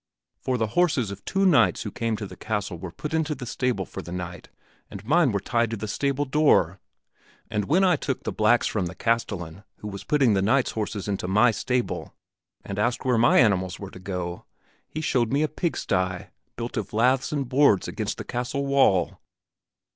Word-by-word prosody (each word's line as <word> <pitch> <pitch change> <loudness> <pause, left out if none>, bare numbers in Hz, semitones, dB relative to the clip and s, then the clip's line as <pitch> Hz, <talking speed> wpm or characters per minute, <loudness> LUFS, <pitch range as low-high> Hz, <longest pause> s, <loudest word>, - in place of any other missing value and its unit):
For 130 -1 -1
the 110 -2 -1
horses 145 - +2
of 100 - -9
two 195 0 +1
knights 115 - +4
who - - -5
came 115 -2 -2
to 105 - -5
the - - -10
castle 105 -5 -3
were 85 0 -7
put 150 - -6
into 160 -1 0
the 130 - -7
stable 125 -5 -1
for - - -7
the 85 - -10
night 90 -1 -6 0.4
and - - -9
mine 155 +1 +4
were 100 - 0
tied 115 +3 0
to 115 - -3
the 110 - -5
stable 140 +6 -1
door. 150 +2 +3 0.7
And 105 -2 0
when 180 +7 +3
I 180 -4 +4
took 135 -2 -3
the - - -2
blacks 110 +2 +3
from 95 -5 -1
the 90 - -8
castellan, 100 -5 -2
who 105 - -8
was 100 -1 -7
putting 135 -5 +3
the 95 - +2
knights' 125 +7 +2
horses 105 -2 -4
into 100 -2 -2
my 105 +6 +4
stable, 125 +3 -2 0.5
and 100 0 -4
asked 120 +4 0
where 125 -3 +3
my 120 - +5
animals 95 -5 +3
were 100 -1 -7
to - - -11
go, 90 -2 -5 0.4
he 155 - -5
showed 120 -6 +1
me 140 +3 +2
a - - +2
pigsty 95 - -2 0.3
built 120 0 -5
of 105 -2 -4
laths 125 +4 +2
and 140 -3 -1
boards 130 -6 +3
against - - -3
the - - -5
castle 125 +3 -3
wall." 135 -11 +3
115 Hz, 200 wpm, -25 LUFS, 100-135 Hz, 0.7 s, my